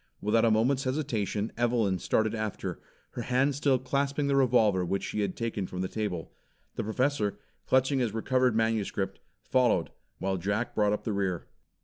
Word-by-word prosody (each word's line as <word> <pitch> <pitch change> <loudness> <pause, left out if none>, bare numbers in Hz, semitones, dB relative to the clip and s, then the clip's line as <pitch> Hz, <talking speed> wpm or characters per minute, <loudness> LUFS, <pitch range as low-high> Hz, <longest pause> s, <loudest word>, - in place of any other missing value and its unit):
Without 110 +2 +2
a - - +5
moment's 125 +5 +2
hesitation, 115 -6 -1
Evelyn 115 -6 +1
started 110 +4 +1
after, 110 -2 -4 0.3
her 120 - -5
hand 130 +4 +2
still 140 -1 +2
clasping 140 +3 -1
the 140 0 +2
revolver 115 -8 +4
which 95 +2 -1
she - - -3
had 100 -3 -1
taken 110 -5 -2
from 90 - -5
the 95 - -1
table. 95 -5 -4 0.4
The - - -3
Professor, 110 -1 0 0.3
clutching 130 +1 +3
his 120 -4 +1
recovered 125 +2 +1
manuscript, 110 -3 0 0.2
followed, 125 -10 +2 0.3
while 95 0 -1
Jack 100 +6 -1
brought 105 -1 +2
up 105 - -1
the 110 - -2
rear. 95 -3 -1
110 Hz, 165 wpm, -29 LUFS, 100-130 Hz, 0.4 s, a